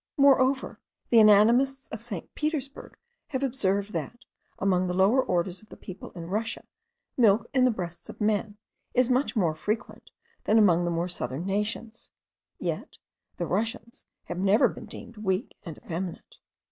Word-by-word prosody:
Moreover, 270 -1 +3 0.3
the 230 - +7
anatomists 235 +6 +5
of 220 - -7
St. 215 -8 -6
Petersburgh 300 -3 -4 0.3
have 270 -2 -3
observed 205 -6 0
that, 240 +3 -5 0.3
among 185 -2 +1
the 180 - -2
lower 200 +8 +4
orders 180 0 -1
of 215 - -20
the - - -12
people 185 -1 -9
in 170 -2 -6
Russia, 215 +6 -3 0.5
milk 220 -3 +4
in 255 -1 +4
the - - +5
breasts 175 -6 -5
of - - -10
men 210 0 0 0.4
is 250 0 +3
much 260 +2 +1
more 175 -8 +2
frequent 215 +9 -4 0.4
than 215 - +4
among 175 -5 +5
the - - 0
more 170 +1 -1
southern 150 -2 -4
nations: 210 +3 -3 0.5
yet - - -4 0.4
the 175 - -2
Russians 225 +5 -3 0.2
have 175 +1 -5
never 200 +3 +4
been - - -8
deemed 230 - -10
weak 200 +3 -2
and 165 -7 -8
effeminate. 175 +1 -6
210 Hz, 160 wpm, -27 LUFS, 185-240 Hz, 0.5 s, the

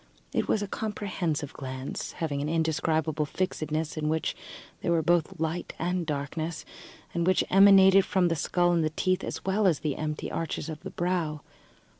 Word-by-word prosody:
It - - 0
was 210 - +1
a - - -4
comprehensive 180 -8 -3
glance, 130 -1 -5
having 145 -4 -2
an 150 - -2
indescribable 160 -1 0
fixedness 155 -3 -2
in 155 0 0
which 160 0 -1 0.5
there - - 0
were 165 -1 +2
both 175 +1 +1
light 165 +2 -2
and 180 -1 -1
darkness, 155 +2 -3 0.5
and 170 0 0
which 185 - +4
emanated 195 0 +7
from 190 -2 +2
the 165 - +1
skull 175 +3 +1
and 160 -2 0
teeth, 185 0 +1
as - - -5
well 195 +2 +2
as 165 -6 +2
the 150 -3 -2
empty 150 0 -3
arches 165 -1 -3
of 155 -1 -6
the - - -6
brow. 170 -4 -1
165 Hz, 170 wpm, -28 LUFS, 155-185 Hz, 0.5 s, emanated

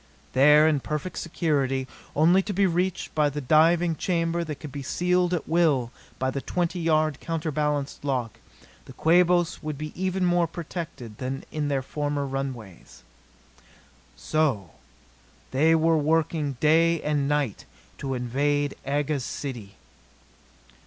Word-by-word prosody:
There, 150 +3 +6
in 155 -3 +2
perfect 150 +6 -4
security, 140 -6 -1 0.3
only 170 +6 +5
to 205 +1 -4
be 195 +1 +3
reached 180 +1 -1
by 150 -2 +2
the 145 +1 -4
diving 160 +4 +3
chamber 170 0 -1
that 155 -2 -5
could 150 - -8
be 140 - -6
sealed 180 +5 +1
at 175 -3 -2
will 155 -8 +2 0.3
by 130 0 -1
the 140 - -3
twenty 175 +3 -2
yard, 155 -3 +1
counterbalanced 150 -4 -2
lock, 125 -6 -2 0.5
the - - -12
Quabos 175 +1 +3
would 155 -2 -4
be 155 +1 -6
even 185 0 -1
more 175 -1 +2
protected 165 - -7
than 130 +1 -4
in 150 -1 -2
their 140 -2 -1
former 145 +1 -2
runways. 130 - -6 1.1
So 135 - 0 0.8
they 155 +5 +4
were 160 0 +3
working 155 -2 0
day 165 +2 +4
and 145 -2 0
night 145 -7 -1 0.3
to 135 -1 -3
invade 145 +4 0
Aga's 145 0 -1
city! 115 -8 -6
150 Hz, 135 wpm, -25 LUFS, 135-165 Hz, 1.1 s, There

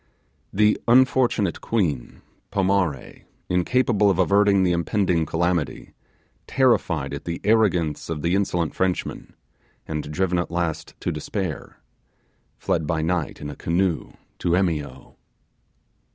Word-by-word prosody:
The 105 +2 +2
unfortunate 120 -5 +3
queen 80 - -2 0.3
Pomare, 95 -8 -1 0.2
incapable 105 +3 +2
of 95 - +1
averting 100 +1 +4
the 90 - +2
impending 85 -1 +1
calamity, 85 -1 -1 0.5
terrified 90 - +1
at 70 - -6
the 85 -1 -3
arrogance 95 -10 +1
of 75 -3 -4
the 85 - +1
insolent 90 -4 0
Frenchman, 95 -1 -2 0.5
and 75 -1 -4
driven 90 +2 0
at 85 - -2
last 85 -2 -3
to - - -1
despair, 90 -8 -5 0.8
fled 80 -2 -1
by 80 -2 0
night 85 -1 -2
in 75 - -5
a - - -9
canoe 85 +1 -1 0.3
to 85 - +1
Emio. 75 -8 -2
90 Hz, 120 wpm, -23 LUFS, 80-100 Hz, 0.8 s, averting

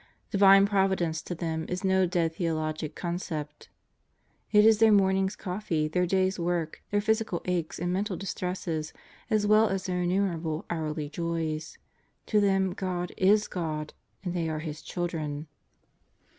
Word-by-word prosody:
Divine 195 -1 +7
Providence 190 -5 +1
to 175 - -5
them 160 -1 -3
is 180 +1 -3
no 190 -1 +3
dead 170 -2 0
theologic 155 -2 -2
concept. 160 -4 -5 0.8
It 210 0 +6
is 220 -1 +6
their 225 -1 +6
morning's 190 -1 +3
coffee, 180 -5 -2
their 180 +3 0
day's 190 +1 +1
work, 170 -2 -2
their 205 0 +1
physical 220 -4 0
aches 175 -3 -2
and 175 +1 -1
mental 195 0 -1
distresses 180 -4 -3 0.4
as 215 -2 +2
well 215 +1 +5
as 195 0 -2
their 180 -1 -1
innumerable 175 -2 -1
hourly 155 -2 -2
joys. 160 -1 -3 0.5
To 210 -1 +2
them 195 -2 +2
God 180 -2 -3
is 205 +3 +4
God, 155 -4 -4 0.3
and 180 -2 -3
they 170 -2 -1
are 155 - -2
His 155 0 -6
children. 155 -4 -3
180 Hz, 145 wpm, -28 LUFS, 160-195 Hz, 0.8 s, Divine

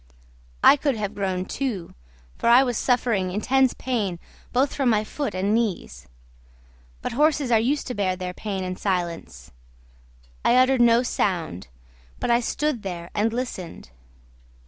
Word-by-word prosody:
I 290 - +8
could 280 -2 0
have 210 -2 -3
groaned, 190 -2 -2
too, 225 -11 -4 0.4
for - - 0
I 245 +3 +7
was 245 -2 -1
suffering 230 -6 +1
intense 255 +7 +2
pain 215 -9 -2 0.3
both 265 +3 +1
from 270 -3 +1
my 215 -2 +2
foot 280 +1 -4
and 195 +3 0
knees; 180 - -2 1.0
but - - -2
horses 290 0 +2
are 225 - +5
used 275 +6 0
to 250 - -4
bear 190 -4 0
their 180 0 -5
pain 195 -1 -4
in 185 0 -4
silence. 170 - -3 0.9
I 240 - +4
uttered 255 0 +4
no 235 +1 +5
sound, 165 - -2 0.5
but - - 0
I 235 - +4
stood 285 +1 -1
there 175 -3 -6
and 215 +2 +1
listened. 220 - -6
220 Hz, 150 wpm, -24 LUFS, 185-255 Hz, 1.0 s, I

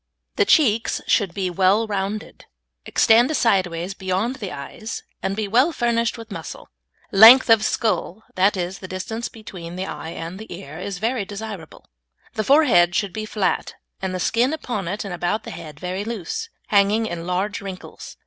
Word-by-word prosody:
The - - +3
cheeks 230 -8 +3
should 200 -5 +2
be 185 0 -2
well 195 +5 +3
rounded, 205 0 -4 0.4
extend 240 +7 +4
sideways 185 -4 +1
beyond 190 +7 -2
the 200 -6 -6
eyes, 145 +10 -7 0.2
and 195 - -2
be 215 -1 -2
well 250 +10 +3
furnished 235 -4 0
with 225 -1 -10
muscle. - - -8 0.4
Length 225 +5 +9
of 225 -1 +6
skull 220 -2 -1
that 195 +2 +2
is, 180 +1 -3
the 185 - -8
distance 220 +5 -4
between 180 -6 -9
the 185 +1 -3
eye 160 - -6
and 170 +3 -7
the 220 - -10
ear 160 -3 -8
is 195 0 -5
very 225 +3 -1
desirable. 200 -4 -8 0.5
The 215 - -1
forehead 210 - +4
should 200 -3 0
be 215 0 -4
flat, 205 -3 -1 0.3
and 190 -1 -2
the - - -3
skin 240 - +1
upon 235 - -4
it 205 +4 -3
and 195 - -5
about 175 +5 -1
the - - -8
head 155 -3 -9
very 185 +3 -3
loose, 230 - -4 0.2
hanging 205 +2 +3
in 170 -4 -5
large 190 +3 -1
wrinkles. 190 -2 -9
200 Hz, 175 wpm, -22 LUFS, 185-225 Hz, 0.5 s, Length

